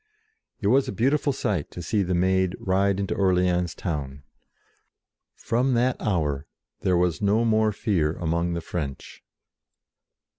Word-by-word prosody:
It - - -5
was 135 +3 +3
a - - -2
beautiful 140 +8 +1
sight 100 - -2
to 90 - -8
see 105 +6 0
the 90 -1 0
Maid 95 0 +2
ride 95 +1 +1
into 100 - -1
Orleans 90 -2 +1
town. 70 -5 -4 1.1
From 125 +2 0
that 125 +2 +2
hour 75 -8 -1 0.3
there 90 -2 +1
was 90 0 +1
no 105 +3 +2
more 110 -1 +3
fear 90 -7 0
among 85 +1 -1
the 85 - -3
French. 75 -5 -6
95 Hz, 140 wpm, -25 LUFS, 85-110 Hz, 1.1 s, was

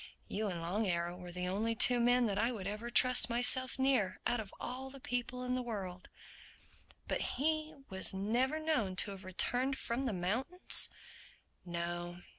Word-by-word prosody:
You 215 +1 -2
and 175 -4 -4
Long 200 +6 -1
Arrow 175 -1 -1
were 180 -1 -10
the 180 +1 -4
only 215 +5 -1
two 245 +2 +6
men 245 +1 +3
that 200 -2 -1
I 230 +3 +1
would 210 -6 -6
ever 210 +4 -4
trust 250 -1 +6
myself 245 +2 +3
near—out 255 -3 0
of 210 -3 -6
all 260 +2 -6
the 275 +1 -12
people 245 0 -3
in 250 0 -2
the 255 - -1
world." 195 -7 -6 1.0
"But - - -1 0.7
was 190 0 +1
he - - -1
never 245 +9 0
known 295 -12 -1
to 200 - +4
have 195 0 -9
returned 245 +8 +1
from 250 +3 -2
the 230 - -1
mountains?" 230 - +1 0.7
"No. 175 0 -4
225 Hz, 170 wpm, -34 LUFS, 185-250 Hz, 1.0 s, two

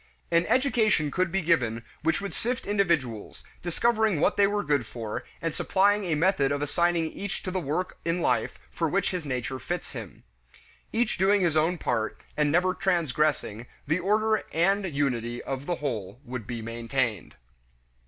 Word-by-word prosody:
An 170 +1 +3
education 220 - +2
could 185 +1 0
be 195 0 0
given 120 -9 +1 0.2
which 160 +4 +1
would 200 - -4
sift 250 +3 -2
individuals, 170 - 0 0.2
discovering 215 +1 +2
what - - +3
they 200 -1 +5
were 205 0 0
good 145 -6 +1
for, 110 -3 -5 0.2
and 165 -2 0
supplying 200 +4 +2
a 165 -3 +1
method 150 -4 +2
of 145 - 0
assigning 165 +2 +1
each 200 -1 -5
to 185 - -3
the 185 - -1
work 165 +3 -2
in 170 +1 0
life - - +1
for 165 -2 0
which 195 +5 +1
his 175 -5 -4
nature 130 0 -2
fits 175 +8 -4
him. 115 -8 -9 0.7
Each 230 -4 0
doing 195 +2 +4
his 170 -4 +2
own 160 +3 +2
part, 115 -7 -1 0.2
and 150 -1 +2
never 180 +3 +3
transgressing, 150 - 0 0.2
the 160 +5 +1
order 215 +4 +2
and 190 +3 +2
unity 120 -4 -1
of 135 +1 -4
the 175 - +1
whole 120 - -4
would 125 -3 -6
be 120 -2 -4
maintained. 115 -1 -2
165 Hz, 170 wpm, -27 LUFS, 130-190 Hz, 0.7 s, they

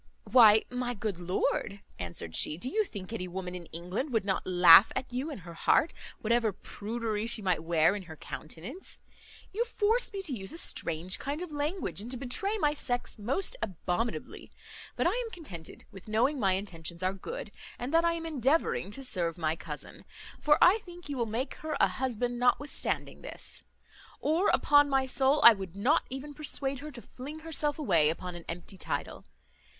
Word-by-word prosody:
"Why, 220 -4 +7
my 250 -1 -2
good 200 -4 -3
lord," 190 +3 -1 0.2
answered 85 -2 -5
she, 150 - +3
"do 210 - -4
you 430 +9 +1
think 200 - -8
any 185 -5 -3
woman 180 0 -5
in 175 -2 -8
England 180 - -4
would 225 -4 +1
not 190 -1 -1
laugh 180 +1 +8
at 255 -1 -4
you 260 +5 -2
in 290 - -6
her 170 -2 -10
heart, 295 - +3 0.3
whatever 230 0 +2
prudery 220 +2 -4
she 230 -2 -2
might 180 -4 +1
wear 165 +2 +3
in 205 - -4
her 160 - -8
countenance? 175 - -7 0.5
You 450 +4 +1
force 460 +1 +1
me 395 -2 -4
to 315 -8 -1
use 195 -5 -5
a - - -5
strange 170 - 0
kind 290 +5 -3
of 355 - -8
language, 295 - -2
and 225 - -7
to 255 - -5
betray 330 - -1
my 295 -7 +2
sex 245 -5 -2
most 275 - -1
abominably; 190 +4 -3 0.4
but - - 0
I - - +4
am 485 -1 -2
contented 190 - -9
with 195 +1 -13
knowing 240 +7 +2
my 195 -4 +3
intentions 175 -3 -4
are 185 +1 +1
good, 195 +2 -7 0.3
and 250 +5 -5
that 330 +1 +5
I 335 0 +3
am 330 -1 -5
endeavouring 280 - +1
to 270 - -4
serve 175 -9 0
my 160 -2 0
cousin; - - -8 0.4
for 300 0 +4
I 385 +5 +6
think 350 -5 -12
you 280 - -3
will 235 -2 0
make 235 +5 -2
her 310 0 -3
a - - +6
husband 245 -2 -2
notwithstanding 250 +4 0
this; - - -5 0.6
or, 330 +6 +2
upon 290 0 +5
my 270 -1 +2
soul, 265 +3 +2
I 235 - +11
would 190 -4 -7
not 255 +11 +2
even 270 +3 -6
persuade 280 -2 -1
her 300 +3 -7
to 240 -5 -11
fling 290 +5 -9
herself 305 -2 -1
away 170 - +3
upon 180 +3 -4
an 175 -1 -9
empty 175 +3 -7
title. - - -4
240 Hz, 190 wpm, -30 LUFS, 185-295 Hz, 0.6 s, I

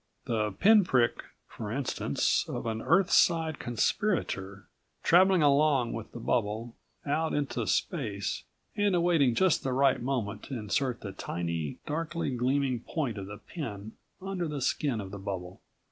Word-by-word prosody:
The 105 -3 -1
pinprick, 180 - +4 0.3
for 105 -2 -7
instance, 135 +2 0
of - - -4
an 110 -1 -2
Earthside 165 -3 +3
conspirator, 105 - -1 0.4
traveling 185 0 +5
along 140 -4 +3
with 115 -2 -6
the 120 - -8
bubble 115 0 -1 0.3
out 160 +3 0
into 145 -2 -2
space 105 - -1 0.3
and 205 -2 +2
awaiting 165 -8 +3
just 190 +1 +3
the 130 - -2
right 135 -1 +3
moment 115 -5 -2
to 135 - -5
insert 120 +4 -1
the 100 - -6
tiny, 85 -5 -4
darkly 165 0 -2
gleaming 130 0 +1
point 120 -4 -3
of 95 - -6
the 105 +1 -8
pin 110 - -7 0.3
under 185 -2 -3
the 150 -2 -4
skin 130 -2 0
of 95 -2 -6
the 100 - -7
bubble. 95 -2 -6
130 Hz, 145 wpm, -29 LUFS, 105-160 Hz, 0.4 s, traveling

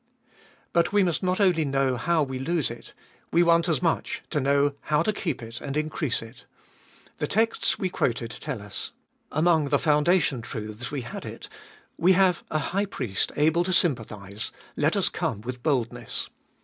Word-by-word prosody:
But 170 +2 +3
we 205 -1 +4
must 175 -3 0
not 185 0 0
only 180 -5 +4
know 135 -2 +1
how 160 +6 +2
we 130 -2 -4
lose 160 -1 0
it; 115 0 -11 0.4
we 170 - +5
want 170 0 +4
as 165 +2 +1
much 165 - 0
to 150 - +1
know 140 +1 +3
how 150 -1 +2
to 215 - +1
keep 165 - -3
and 120 +5 -5
increase 155 -5 0
it. 120 +2 -13 0.7
The 150 - 0
texts 225 +5 +2
we 185 - -1
quoted 120 -8 -1
tell 125 -2 -5
us. 100 -1 -6 0.4
Among 155 -1 +3
the - - +4
foundation 150 -3 +3
truths 110 +1 -6
we 145 -3 -3
had 120 - -7
it: - - -8 0.5
We 180 +3 +5
have 185 -1 +3
a 155 - 0 0.2
High 200 +2 +2
Priest 120 - -1
able 160 +3 +3
to 185 +1 0
sympathise, 110 - -1 0.2
let - - +2
us - - +3
come 105 - -2
with 125 +2 -6
boldness. 130 -6 -1
150 Hz, 175 wpm, -26 LUFS, 120-170 Hz, 0.7 s, we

